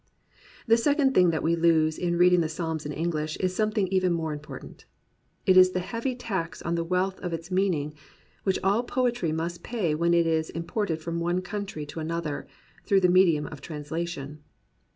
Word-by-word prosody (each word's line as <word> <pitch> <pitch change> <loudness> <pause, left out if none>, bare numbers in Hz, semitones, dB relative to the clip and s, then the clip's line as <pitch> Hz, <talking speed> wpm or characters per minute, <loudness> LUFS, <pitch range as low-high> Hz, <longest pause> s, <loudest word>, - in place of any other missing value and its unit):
The 230 -1 +5
second 285 +2 +2
thing 180 -6 +5
that 160 -2 -1
we 165 +1 +2
lose 160 -2 +3
in 175 -1 0
reading 180 0 +5
the 160 - -1
Psalms 160 -2 -3
in - - -4
English 155 -1 -2
is 185 -1 -1
something 215 -2 +1
even 185 -1 +2
more 160 -2 -2
impor 150 +1 -8
tant. - - -14 0.6
It 185 - +5
is 185 0 +7
the 185 - 0
heavy 230 +7 -3
tax 190 -8 -4
on 170 - -1
the 170 0 0
wealth 185 +2 -1
of 180 -3 -4
its 165 +2 -6
mean 190 -1 +2
ing, 150 0 -4 0.5
which 190 -1 +1
all 200 +4 +3
poetry 240 -8 0
must 165 +2 -3
pay 210 -10 -1
when 170 +2 +2
it 170 -1 +4
is 160 -1 0
imported 165 0 -3
from 170 0 -3
one 175 +2 0
country 195 -5 -5
to 145 +3 -8
another, 160 -2 -3 0.4
through 195 -1 +3
the 180 - +4
medium 175 -5 +4
of 145 -2 -9
translation. 150 -1 -5
170 Hz, 195 wpm, -27 LUFS, 160-190 Hz, 0.6 s, is